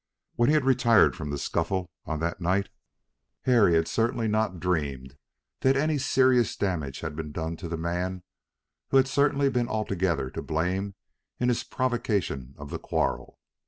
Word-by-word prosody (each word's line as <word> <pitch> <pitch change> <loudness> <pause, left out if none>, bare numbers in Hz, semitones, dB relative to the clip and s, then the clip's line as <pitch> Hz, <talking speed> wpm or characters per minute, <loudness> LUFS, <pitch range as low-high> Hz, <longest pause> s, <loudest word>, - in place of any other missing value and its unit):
When 120 +2 +2
he 155 - +4
had 150 -3 +2
retired 120 -4 +4
from 80 -4 -5
the 75 - -2
scuffle 90 +5 -2
on 80 -1 -3
that 85 +2 -2
night, 95 +3 +1 0.7
Harry 115 -9 +4
had 80 0 +2
certainly 115 +3 0
not 110 -4 0
dreamed 70 -7 -2 0.4
that 135 +1 +3
any 150 +1 +1
serious 130 -4 +3
damage 80 -9 -2
had 75 - -5
been 80 -1 -5
done 80 +2 -3
to 85 - -6
the 85 - -3
man 90 +2 -3 0.7
who 135 - +4
had 130 0 +5
certainly 140 +1 +2
been 125 -3 0
altogether 95 - -1
to - - -5
blame 95 +5 -2 0.4
in 125 - +2
his 120 - 0
provocation 100 - -2
of 70 0 -9
the - - -4
quarrel. - - -2
95 Hz, 165 wpm, -27 LUFS, 80-120 Hz, 0.7 s, had